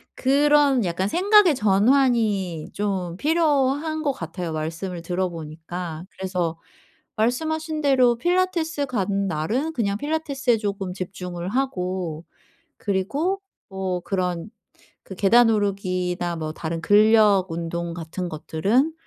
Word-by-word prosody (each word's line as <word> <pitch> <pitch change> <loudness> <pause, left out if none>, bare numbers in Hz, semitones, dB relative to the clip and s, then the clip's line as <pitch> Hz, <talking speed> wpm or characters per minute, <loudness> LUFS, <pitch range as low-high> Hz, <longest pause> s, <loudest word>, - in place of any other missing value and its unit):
그런 280 -3 +3
약간 180 +3 -1
생각의 385 - +5
전환이 210 - +2
좀 190 -4 -2
필요한 305 0 +1
것 285 - +2
같아요 170 -2 -5
말씀을 165 +3 -4
들어보니까. 170 -1 -4
그래서 180 -3 -3 0.6
말씀하신 310 +7 -1
대로 255 -4 +4
필라테스 345 -2 0
가는 200 -4 -1
날은 225 - -1
그냥 200 -6 -1
필라테스에 285 -3 0
쪼금 200 -3 -3
집중을 180 -1 -5
하고 185 - -2 0.5
그리고 275 - -1 0.3
뭐 190 -2 -2
그런 180 0 -2 0.5
그 190 - -9
계단 225 +5 +5
오르기나 185 -4 -1
뭐 155 -1 -4
다른 165 +1 -4
근력 210 -1 +5
운동 170 +1 -3
같은 175 +2 -5
것들은 200 - 0
200 Hz, 260 characters per minute, -23 LUFS, 175-270 Hz, 0.6 s, 생각의